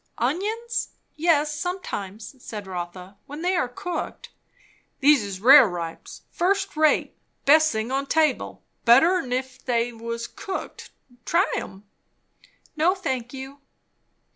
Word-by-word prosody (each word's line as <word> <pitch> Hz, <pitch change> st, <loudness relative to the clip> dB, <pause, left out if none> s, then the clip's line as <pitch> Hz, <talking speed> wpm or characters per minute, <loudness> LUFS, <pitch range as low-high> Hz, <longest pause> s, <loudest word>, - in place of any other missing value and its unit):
"Onions? 420 Hz, -, -1 dB, 0.3 s
Yes, 305 Hz, -2 st, +2 dB
sometimes," 230 Hz, -, -5 dB
said 210 Hz, -2 st, -7 dB
Rotha, 180 Hz, +1 st, -7 dB
"when 295 Hz, +4 st, -7 dB
they 365 Hz, +1 st, +1 dB
are 255 Hz, -, +1 dB
cooked." 340 Hz, +8 st, -6 dB, 0.7 s
"These 285 Hz, -2 st, +5 dB
is 195 Hz, -2 st, -6 dB
rareripes. 205 Hz, -, +4 dB
First 390 Hz, +2 st, 0 dB
rate 310 Hz, 0 st, +2 dB, 0.3 s
best 310 Hz, +2 st, +6 dB
thing 220 Hz, +2 st, -3 dB
on 275 Hz, +1 st, -1 dB
table. 315 Hz, 0 st, 0 dB, 0.2 s
Better 295 Hz, +11 st, +6 dB
'n 255 Hz, -7 st, -6 dB
if 255 Hz, 0 st, -3 dB
they 240 Hz, -1 st, 0 dB
was 230 Hz, +1 st, -5 dB
cooked. 380 Hz, +9 st, -7 dB, 0.3 s
Try 345 Hz, -, +2 dB
'em?" 190 Hz, +1 st, -6 dB, 0.9 s
"No, 335 Hz, +5 st, +3 dB
thank 255 Hz, -10 st, -3 dB
you." 270 Hz, +1 st, -9 dB
270 Hz, 120 wpm, -24 LUFS, 230-330 Hz, 0.9 s, best